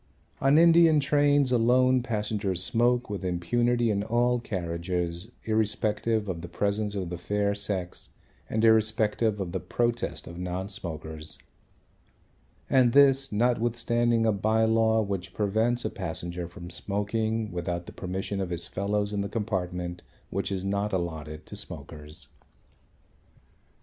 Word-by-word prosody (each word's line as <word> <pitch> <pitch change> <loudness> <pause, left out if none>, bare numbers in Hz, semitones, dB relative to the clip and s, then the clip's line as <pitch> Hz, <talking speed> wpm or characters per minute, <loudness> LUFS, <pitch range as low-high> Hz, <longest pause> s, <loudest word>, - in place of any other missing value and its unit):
On 135 +2 +5
Indian 165 -1 +6
trains 145 -1 +3
alone 125 +2 +4
passengers 105 -5 -1
smoke 120 +2 +2
with 100 -2 -5
impunity 120 +7 +1
in 100 -1 0
all 120 +3 +1
carriages 85 -1 -3
irrespective 110 0 0
of 85 -3 -4
the 85 - -7
presence 105 +2 -1
of 95 -3 -3
the 90 - -5
fair 100 +2 0
sex 100 -3 -2 0.4
and 110 +1 +1
irrespective 110 -1 +3
of 95 -3 -3
the 95 - -2
protest 120 -9 -2
of 85 +1 -9
non 90 +2 -3
smokers. 80 -5 -6 1.3
And 125 -3 +4
this, 135 -1 +5
notwithstanding 120 0 +2
a 110 - +4
bye 110 +2 +2
law 110 0 +3
which 95 -2 -4
prevents 110 +4 +1
a 110 - -1
passenger 85 -1 -5
from 85 +1 -10
smoking 105 +4 -2
without 85 0 -3
the - - -10
permission 95 +2 -3
of 95 - -3
his 85 -1 -3
fellows 100 +3 -1
in 100 - 0
the 100 - -3
compartment 90 -5 -3 0.3
which 100 +2 -2
is 95 -1 -2
not 100 +1 -1
allotted 80 -4 -4
to - - -9
smokers. 75 +1 -8
105 Hz, 135 wpm, -27 LUFS, 90-115 Hz, 1.3 s, Indian